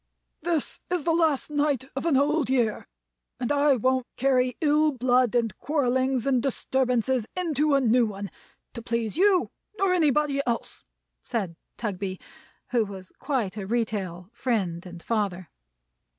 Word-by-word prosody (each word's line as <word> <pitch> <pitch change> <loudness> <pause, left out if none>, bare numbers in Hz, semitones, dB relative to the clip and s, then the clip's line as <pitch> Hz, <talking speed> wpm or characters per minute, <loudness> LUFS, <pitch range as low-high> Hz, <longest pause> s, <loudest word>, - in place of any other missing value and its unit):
"This 330 -4 -1
is 355 -3 0
the 330 - +2
last 320 -4 +1
night 290 -3 +1
of 275 - -2
an 295 -5 +4
Old 295 +1 +2
Year, 240 -5 +1 0.5
and 245 +1 -1
I 290 -1 +4
won't 255 +1 +1
carry 255 -2 +2
ill 305 0 +3
blood 250 -2 +2
and 230 -4 +1
quarrelings 260 -3 +1
and 260 -3 +2
disturbances 255 -2 0
into 305 -4 +1
a 275 - +3
New 240 -1 +4
One, 200 -1 -6 0.4
to 235 - -6
please 230 -2 -2
you 375 +1 +3 0.3
nor 390 -2 +2
anybody 300 -4 +2
else," 235 -1 -3 0.4
said 195 -7 -3 0.2
Tugby, 195 -4 -3 0.5
who 240 -2 +3
was 195 -3 -9
quite 235 -9 -2
a 195 -2 -5
retail 200 -5 -2
Friend 195 -9 -1
and 175 -1 -10
Father. 200 -6 -2
255 Hz, 145 wpm, -26 LUFS, 220-290 Hz, 0.5 s, an